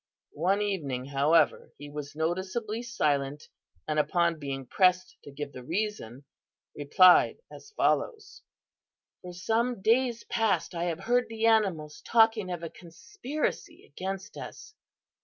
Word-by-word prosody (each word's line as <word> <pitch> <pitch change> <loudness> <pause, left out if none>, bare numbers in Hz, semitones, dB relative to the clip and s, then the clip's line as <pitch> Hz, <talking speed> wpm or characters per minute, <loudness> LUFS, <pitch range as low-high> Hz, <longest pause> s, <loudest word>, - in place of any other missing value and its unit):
"One 195 +5 +2
evening, 145 -11 -3
however, 145 +3 +2
he 145 - -9
was 145 0 -7
noticeably 190 +8 -2
silent 145 - -1 0.4
and 155 0 0
upon 170 +1 +1
being 135 -2 -5
pressed 185 +7 +2
to 145 - -12
give 140 +1 -6
the 130 - -9
reason, 165 - -4 0.5
replied 180 +5 +5
as - - -12
follows: 440 -4 -1 0.8
"'For 180 - -8
some 225 +7 -1
days 235 +3 +1
past 225 -5 0
I 170 0 -2
have 170 -2 -3
heard 245 +1 +1
the 225 0 -2
animals 185 -10 +1
talking 225 -4 +3
of 175 -2 -5
a 165 - -4
conspiracy 245 - -5
against 190 +1 -6
us. 430 - -9
180 Hz, 130 wpm, -28 LUFS, 150-220 Hz, 0.8 s, replied